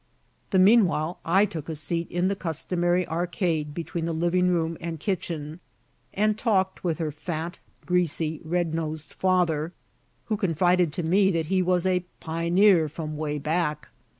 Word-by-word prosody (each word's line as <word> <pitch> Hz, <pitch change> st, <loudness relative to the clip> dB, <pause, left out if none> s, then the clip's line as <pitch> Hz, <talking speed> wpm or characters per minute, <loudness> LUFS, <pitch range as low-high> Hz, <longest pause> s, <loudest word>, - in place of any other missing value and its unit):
The 190 Hz, -, +2 dB
meanwhile, 185 Hz, -5 st, +4 dB
I 190 Hz, +5 st, +4 dB
took 165 Hz, -6 st, -6 dB
a 160 Hz, -, -3 dB
seat 165 Hz, +3 st, -2 dB
in 175 Hz, +1 st, 0 dB
the 200 Hz, -, 0 dB
customary 175 Hz, +1 st, 0 dB
arcade 165 Hz, -3 st, -1 dB
between 170 Hz, 0 st, -3 dB
the 165 Hz, -, -1 dB
living 175 Hz, +2 st, +2 dB
room 165 Hz, -2 st, +1 dB
and 165 Hz, -2 st, -4 dB
kitchen, 160 Hz, -3 st, -3 dB, 0.5 s
and 215 Hz, +1 st, +1 dB
talked 190 Hz, -5 st, +1 dB
with 170 Hz, -3 st, 0 dB
her 160 Hz, -3 st, -2 dB
fat, 160 Hz, +3 st, -5 dB, 0.3 s
greasy, 165 Hz, -3 st, 0 dB
red 170 Hz, 0 st, -1 dB
nosed 155 Hz, -2 st, -4 dB
father, 175 Hz, -3 st, +1 dB, 0.5 s
who 215 Hz, -, -1 dB
confided 180 Hz, -3 st, +2 dB
to 175 Hz, -, -3 dB
me 190 Hz, +4 st, +3 dB
that 165 Hz, -4 st, 0 dB
he 185 Hz, -, +3 dB
was 180 Hz, 0 st, +1 dB
"a 180 Hz, -1 st, +2 dB, 0.2 s
pi'neer 170 Hz, +1 st, +3 dB
from 155 Hz, 0 st, -5 dB
way 150 Hz, -1 st, -2 dB
back." 150 Hz, +1 st, -1 dB
170 Hz, 155 wpm, -26 LUFS, 160-185 Hz, 0.5 s, meanwhile